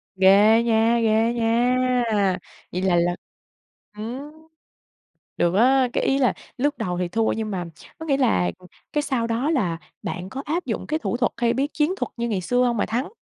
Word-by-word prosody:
Ghê 205 +4 +5
nha! 230 0 +3
Ghê 225 +2 +2
nha! 245 +2 +2 0.7
Vậy 180 - -3
là 185 -2 +2
là 175 +1 +2 0.8
ừm, 255 +7 -6 1.1
được 175 +2 +1
á! 255 +3 +4
Cái - - 0
ý 270 - +2
là 255 - +3 0.2
lúc 290 +3 0
đầu 180 -1 -2
thì 180 - -1
thua, 225 +3 +1
nhưng 220 -1 -3
mà, 180 -2 -3 0.3
có 320 - -6
nghĩa 275 -3 +1
là 90 - +2
ừm, 180 - -16 0.3
cái 295 - +1
sau 240 -5 -1
đó 235 +6 -1
là 180 - 0 0.3
bạn 180 +2 -5
có 270 - -5
áp 335 +4 -2
dụng 225 - -4
cái 310 +1 -1
thủ 240 - -2
thuật 245 - +1
hay 235 0 +1
bí 275 +2 0
chiến 310 +4 +1
thuật - - -3
như 235 0 -2
ngày 195 -4 -1
xưa 245 +7 +1
hông 240 -2 0
mà - - +1
thắng? 245 +7 -2
235 Hz, 200 wpm, -23 LUFS, 200-260 Hz, 1.1 s, Ghê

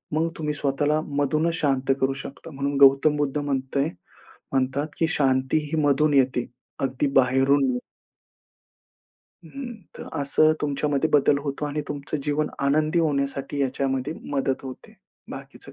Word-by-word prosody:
मग 165 +2 +1
तुम्ही 150 -2 -2
स्वतःला 145 +1 0 0.2
मधूनच 155 +4 +1
शांत 135 -4 +1
करू 135 0 +2
शकता" 140 +4 -10
म्हणून 140 0 -2
गौतम 140 +2 +6
बुद्ध 145 0 -1
म्हणताय 140 -1 -1 0.7
म्हणतात, 135 +2 0
"की 165 - +2
शांती 130 -3 +2
ही 160 -1 +1
मधून 145 +1 +3
येते, 130 -3 +2 0.3
अगदी 135 +1 0
बाहेरून 135 +2 +3
नाही." 125 -1 -1 1.7
हं. 245 - -7 0.2
तर - - -8
असं 155 +2 +4
तुमच्यामध्ये 145 +1 0
बदल 145 0 +4
होतो 140 0 -3
आणि 145 +1 -2
तुमचं 145 +1 -4
जीवन 150 +1 0 0.2
आनंदी 155 +4 +2
होण्यासाठी 140 -2 -1
याच्यामध्ये 135 +1 -1 0.2
मदत 135 -1 -1
होते. 130 -1 -10 0.4
बाकीचं - - -9
140 Hz, 135 wpm, -24 LUFS, 135-150 Hz, 1.7 s, गौतम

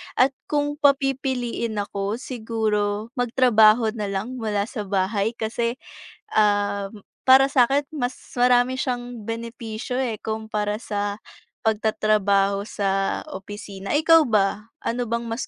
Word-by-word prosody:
At 260 +2 +4 0.2
kung 290 0 -1
papipiliin 265 -5 +1
ako, 200 0 -2
siguro 220 -3 -2
magtrabaho 230 -2 +4
na 215 -2 -4
lang 205 +6 -4
mula 210 -3 0
sa 215 -2 -6
bahay 200 +3 0
kasi, 235 +1 -2 0.6
um, 205 -1 +1 0.2
para 265 +1 +7
sakin 275 +1 +3
mas 250 -4 -1 0.2
marami 245 +1 +4
siyang 245 -3 -4
benepisyo 230 +1 -5
eh, 245 -5 -1
kumpara 220 -1 -2
sa 205 -2 -3 0.5
pagtatrabaho 205 -2 +1
sa 195 -2 -1
opisina. 200 +2 -6
Ikaw 325 +2 +6
ba, 210 0 +1 0.2
ano 240 +1 -2
bang 235 +1 -1
mas 230 +2 -4
220 Hz, 115 wpm, -23 LUFS, 205-245 Hz, 0.6 s, para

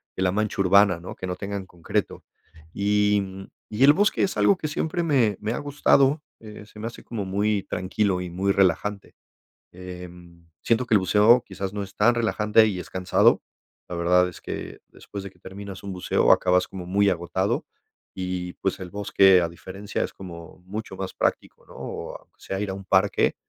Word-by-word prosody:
de - - -4
la 90 - +2
mancha 105 0 -1
urbana, 95 -1 +5
¿no?, 85 - -8
que - - -6
no 90 0 -3
tengan 100 +1 -5
concreto. 85 -2 -3 0.5
Y, 105 +1 +2
mm, 95 0 -8 0.2
y 110 +5 0
el 145 +2 +8
bosque 205 +6 +2
es 195 - -1
algo 200 - +4
que 155 - -3
siempre 160 +3 -2
me 125 - +2
me 110 +2 -2
ha - - -3
gustado, 145 0 +2 0.2
eh, 105 -1 -11
se 105 - -14
me 110 - -5
hace 115 - -10
como 105 -4 -5
muy 100 +1 0
tranquilo 95 0 -1
y 90 - -5
muy 95 +3 0
relajante. 100 +1 0 0.6
Em, 90 -2 -11
siento 120 +2 +1
que 115 - +2
el 105 - +5
buceo 105 +6 +5
quizás 95 -5 -5
no 105 0 -3
es 100 0 -9
tan 120 +3 +4
relajante 110 -2 +3
y 95 -3 -3
es - - -8
cansado. 95 -1 +3 0.5
La 90 - -5
verdad 90 +1 +3
es 90 - -11
que - - -6
después 100 -1 -9
de 100 - -7
que - - -28
terminas 100 0 -9
un 100 - -6
buceo 90 -1 +1
acabas 90 0 +3
como 90 -2 -8
muy 100 +3 +2
agotado 95 +2 -1 0.5
y, 90 -1 -4
pues, 95 - -2
el 90 -1 -7
bosque, 95 -2 +4
a 85 - 0
diferencia, 95 +4 -5
es - - -5
como 85 -3 -11
mucho 105 +1 -6
más 95 0 -5
práctico, - - -2
¿no?, - - -15
o - - -6
aunque - - -31
sea 95 - -4
ir 105 -1 -2
a - - -3
un 95 0 -9
parque, 95 +1 +2
100 Hz, 200 wpm, -24 LUFS, 90-105 Hz, 0.6 s, el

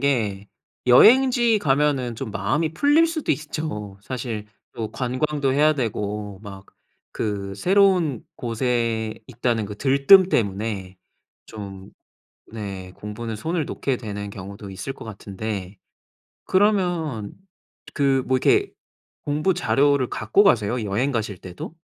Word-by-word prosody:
게 105 -8 0 0.4
여행지 240 - +6
가면은 140 - +1
좀 110 - -6
마음이 150 +8 -1
풀릴 290 - +4
수도 325 -2 -1
있죠. 145 -9 -5
사실 115 -3 -5 0.3
또 110 -2 -5
관광도 135 +2 -1
해야 150 +3 +4
되고 105 -5 -3
막 100 -2 -10 0.5
그 100 -2 -3
새로운 180 - +2
곳에 115 -2 -1
있다는 120 -3 -1
그 105 0 -8
들뜸 140 - +6
때문에 100 - -2 0.5
좀 100 -3 -9 0.6
네. 100 -4 -6
공부는 110 +2 -6
손을 160 +7 -2
놓게 135 -2 -2
되는 100 -3 -6
경우도 100 +1 -9
있을 100 +8 -5
것 - - -11
같은데 100 -2 -6 0.7
그러면 175 - +1 0.6
그 135 -2 +2
뭐 130 - +3
이렇게 400 - +3 0.5
공부 155 +6 +1
자료를 135 +1 +2
갖고 110 - +2
가세요? 120 - +2
여행 110 +7 0
가실 110 -6 -2
때도? 90 - -9
120 Hz, 240 characters per minute, -23 LUFS, 105-150 Hz, 0.7 s, 여행지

